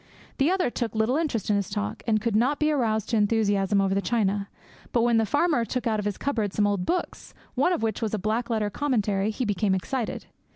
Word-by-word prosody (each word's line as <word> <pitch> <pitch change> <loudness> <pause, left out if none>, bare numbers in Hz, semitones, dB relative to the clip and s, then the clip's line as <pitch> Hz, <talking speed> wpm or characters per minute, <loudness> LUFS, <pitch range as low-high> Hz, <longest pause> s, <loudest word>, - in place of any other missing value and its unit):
The 275 +4 +4
other 365 -8 +1
took 230 -3 -3
little 220 +4 +2
interest 280 - -1
in 205 - +3
his 200 -3 -2
talk, 100 +1 -3
and 215 -1 +3
could 225 0 -1
not 255 +7 +2
be 305 0 +2
aroused 220 -7 0
to 230 - +1
enthusiasm 205 -2 +2
over 195 -1 +2
the 200 - +1
china; 200 -1 0 0.4
but 235 - +2
when 235 -1 +3
the 225 -1 +2
farmer 290 -2 +2
took 250 +2 -3
out 220 -2 +1
of 205 - -3
his 205 -2 -2
cupboard 220 -8 -1
some 210 - +2
old 200 -3 0
books, 360 +1 -3 0.2
one 275 +7 +2
of 340 -9 -1
which 225 +1 -1
was 220 -1 -1
a - - -1
black 220 +4 -1
letter 215 -3 0
commentary, 210 -8 0
he 240 +4 -2
became 205 -1 +1
excited. 235 +5 -3
220 Hz, 235 wpm, -26 LUFS, 205-250 Hz, 0.4 s, The